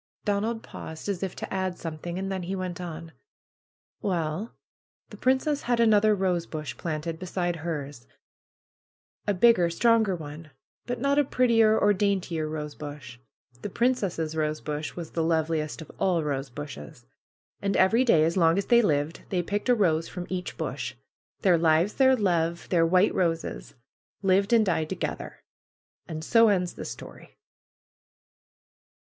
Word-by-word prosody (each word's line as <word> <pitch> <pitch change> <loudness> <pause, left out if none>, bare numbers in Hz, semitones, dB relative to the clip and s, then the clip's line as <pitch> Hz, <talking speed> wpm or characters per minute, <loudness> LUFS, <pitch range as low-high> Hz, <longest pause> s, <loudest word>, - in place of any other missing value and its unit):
Donald 215 +3 -1
paused 160 +3 -8
as 200 -3 -2
if 190 -2 -3
to - - -6
add 185 -2 -2
something; 165 +2 -5
and 195 +1 -3
then 190 -1 -2
he 185 +2 -3
went 185 -2 -4
on: 165 -1 -7 0.9
^^Well, 175 +2 -2 0.6
the - - -10
princess 265 +3 +1
had 240 -1 0
another 215 -2 +5
rosebush 170 -5 -2
planted 160 0 -4
be 185 - -6
side 175 -1 -1
hers; 145 -6 -5 1.2
a 205 - +2
bigger, 180 -4 +5
stronger 220 +2 +3
one; 155 0 -9 0.4
but 245 0 -3
not 280 +3 +2
a - - +5
prettier 230 -4 +3
or 205 0 +4
daintier 185 -6 -1
rosebush. 150 -4 -7 0.4
The - - -4
princess' 195 -9 0
rosebush 155 -1 -3
was 170 -3 -7
the 165 - -1
loveliest 160 -1 0
of - - -14
all 175 -4 +2
rosebushes. 135 - -6 0.6
And 200 0 0
every 220 +7 +4
day, 165 -11 +4
as 165 +1 +1
long 165 -1 +4
as 200 - 0
they 240 -1 +5
lived, 150 -5 0
they 180 -2 0
picked 205 +6 -2
a 245 - +6
rose 165 -7 +2
from 180 -1 -6
each 180 -1 -4
bush. - - -4 0.5
Their 180 -4 +5
lives, 165 +4 +3
their 265 -1 +5
love, 170 -6 0
their 165 -2 +3
white 185 +4 +4
roses, 165 - -2 0.5
lived 195 +3 +3
and 230 -2 +5
died 160 -4 0
to 190 - -2
gether. - - -5 0.6
And 160 -2 -6
so 230 +4 +5
ends 180 -4 +1
the - - -7
story." - - -10
175 Hz, 155 wpm, -27 LUFS, 160-205 Hz, 1.2 s, a